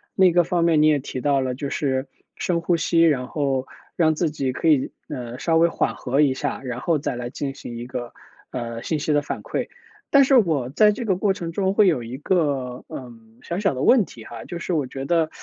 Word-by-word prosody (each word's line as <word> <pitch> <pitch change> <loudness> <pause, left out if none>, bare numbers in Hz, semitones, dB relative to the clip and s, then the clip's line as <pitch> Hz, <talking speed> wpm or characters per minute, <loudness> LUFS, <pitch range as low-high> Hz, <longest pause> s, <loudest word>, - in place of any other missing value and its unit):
另 190 -1 +6
一 - - +1
个 175 -1 +3
方 175 -1 +1
面 160 -3 +4
你 155 - +5
也 150 -1 +4
提 130 -1 -5
到 140 0 +2
了， 130 -1 -1
就 140 +1 -4
是 130 -2 -1 0.3
深 170 -2 0
呼 170 0 +1
吸， 165 +1 +2
然 145 -6 +3
后 135 -2 -1 0.3
让 160 -2 +3
自 155 -1 0
己 135 -4 -2
可 160 +5 +1
以， 140 -4 +3 0.2
呃， 120 -1 -6
稍 165 +1 +2
微 170 +1 +5
缓 - - -1
和 135 +3 0
一 135 -3 +4
下， 145 0 -3
然 125 -2 -4
后 155 +3 +1
再 130 -3 -3
来 120 0 -4
进 135 +2 -4
行 120 -3 -8
一 120 +1 -6
个， 125 -1 -6 0.4
呃， 115 -2 -5
信 160 - -1
息 150 +1 -1
的 145 0 +3
反 - - -5
馈。 - - -3 0.4
但 280 -1 +7
是 270 - +2
我 150 - +1
在 210 +7 +5
这 230 +3 -4
个 190 - +2
过 195 +1 +1
程 170 -4 -5
中 190 +2 0
会 210 -2 +5
有 155 -8 +2
一 120 +3 -6
个， 140 -7 -1
呃， 125 -2 -8 0.3
小 175 +3 -3
小 195 -8 +1
的 130 - -2
问 245 -7 +5
题 110 - -13
哈。 120 - -8
就 175 - -6
是 175 +1 -3
我 145 -5 0
觉 135 +1 -6
得 165 0 +2
150 Hz, 265 characters per minute, -23 LUFS, 130-170 Hz, 0.4 s, 但